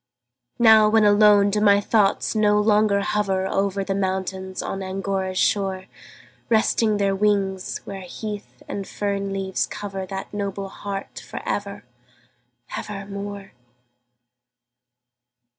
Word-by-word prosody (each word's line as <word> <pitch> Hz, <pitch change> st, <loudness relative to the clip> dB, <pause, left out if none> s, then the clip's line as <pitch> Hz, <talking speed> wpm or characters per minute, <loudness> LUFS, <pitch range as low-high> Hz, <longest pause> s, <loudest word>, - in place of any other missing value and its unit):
Now, 220 Hz, -2 st, +7 dB
when 220 Hz, 0 st, +4 dB
alone, 205 Hz, -1 st, +5 dB
do 210 Hz, +1 st, 0 dB
my 200 Hz, -1 st, +5 dB
thoughts 205 Hz, -1 st, +1 dB
no 210 Hz, -1 st, +3 dB
longer 210 Hz, -1 st, +3 dB
hover 195 Hz, -2 st, 0 dB
Over 195 Hz, 0 st, 0 dB
the 195 Hz, -, -2 dB
mountains 190 Hz, -1 st, -3 dB
on 195 Hz, -, -4 dB
Angora's 190 Hz, 0 st, -3 dB
shore, 190 Hz, -2 st, +1 dB, 0.6 s
Resting 220 Hz, -1 st, +2 dB
their 200 Hz, -1 st, +1 dB
wings, 195 Hz, -2 st, 0 dB
where 195 Hz, -1 st, -7 dB
heath 210 Hz, +3 st, -8 dB
and 200 Hz, -1 st, -5 dB
fern 200 Hz, -1 st, -2 dB
leaves 195 Hz, -1 st, -1 dB
cover 195 Hz, -2 st, -6 dB
That 195 Hz, +2 st, -6 dB
noble 200 Hz, -1 st, -4 dB
heart 195 Hz, 0 st, -6 dB
for -, -, -8 dB
ever, 200 Hz, 0 st, -3 dB, 0.9 s
ever 200 Hz, -2 st, -6 dB
more? 200 Hz, 0 st, -7 dB
200 Hz, 120 wpm, -23 LUFS, 195-210 Hz, 0.9 s, Now